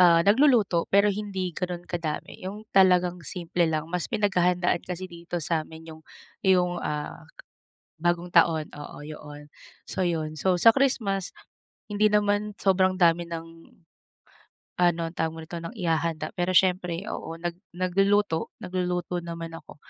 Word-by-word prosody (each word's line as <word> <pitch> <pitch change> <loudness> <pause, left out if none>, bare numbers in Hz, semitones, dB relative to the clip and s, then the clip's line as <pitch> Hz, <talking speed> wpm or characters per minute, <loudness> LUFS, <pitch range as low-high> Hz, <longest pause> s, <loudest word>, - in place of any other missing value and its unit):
ah, 170 -2 +6
nagluluto, 215 - +4
pero 200 +1 +4
hindi 195 -3 -3
ganun 175 0 -4
kadami. 170 -4 -4
Yung 205 +3 -6
talagang 180 -2 +4
simple 170 0 -1
lang. 155 -1 -1
Mas 180 -2 -1
pinaghahandaan 180 -5 +1
kasi 180 0 -5
dito 170 -1 -7
sa 165 -2 +1
'min 160 0 -11
yung 155 - -13 0.4
yung 180 -2 +2
ah, 150 -1 -5 0.7
Bagong 175 +1 0
Taon. 160 -2 +4
Oo, 145 0 -9
yo 155 0 -9
'on. 145 0 -10 0.4
So 185 - -2
yun. 160 -3 -1
So 180 +2 +1
sa 225 +4 +7
Christmas, 220 -9 +1 0.6
hindi 210 +1 +4
naman 205 0 +1
sobrang 185 -1 +2
dami 170 -1 +3
ng 165 -1 -5 1.3
ano, 175 -1 +2
tawag 160 -1 0
mo 165 - -10
nito, 170 - -10
ng 165 - -5
ihahanda. 165 -2 -1
Pero 175 +1 -1
siyempre, 180 -1 +2
oo, 165 +1 -5
nag 175 0 -3 0.2
nagluluto 195 -1 +1
nagluluto 180 -1 -2
naman 165 -1 -6
ako. 165 -2 -11
175 Hz, 145 wpm, -26 LUFS, 165-190 Hz, 1.3 s, sa